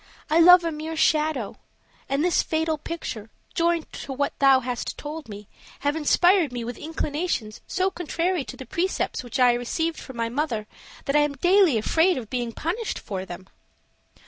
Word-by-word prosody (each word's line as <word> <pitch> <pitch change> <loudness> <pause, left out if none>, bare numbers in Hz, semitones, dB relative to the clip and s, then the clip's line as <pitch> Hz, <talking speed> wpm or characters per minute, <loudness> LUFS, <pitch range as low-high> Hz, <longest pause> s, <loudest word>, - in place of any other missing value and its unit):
I 320 - +5
love 360 +1 +8
a 335 - -1
mere 315 +1 -5
shadow; 305 -7 +1 0.5
and 275 +4 +1
this 355 - +3
fatal 320 -1 -1
picture, 260 -10 -6 0.2
joined 335 -1 0
to 280 - -7
what 280 +2 -1
thou 270 -1 +6
hast 245 -1 -4
told 300 -2 -7
me, 205 -1 -9 0.3
have 285 +1 0
inspired 345 +1 +3
me 245 -1 -4
with 240 +1 -5
inclinations 300 -7 -3
so 375 +1 0
contrary 350 -1 -1
to - - -9
the 260 - -8
precepts 355 -4 -2
which 245 +2 -5
I 250 -1 +6
received 320 +7 -2
from 260 -3 -10
my 230 0 0
mother 240 -4 -2 0.4
that 275 - -1
I - - +6
am 295 -1 +2
daily 355 - +4
afraid 325 - +2
of 230 -5 -7
being 240 -2 -2
punished 370 - -3
for 190 -2 -5
them." 185 +1 -9
295 Hz, 175 wpm, -25 LUFS, 245-335 Hz, 0.5 s, love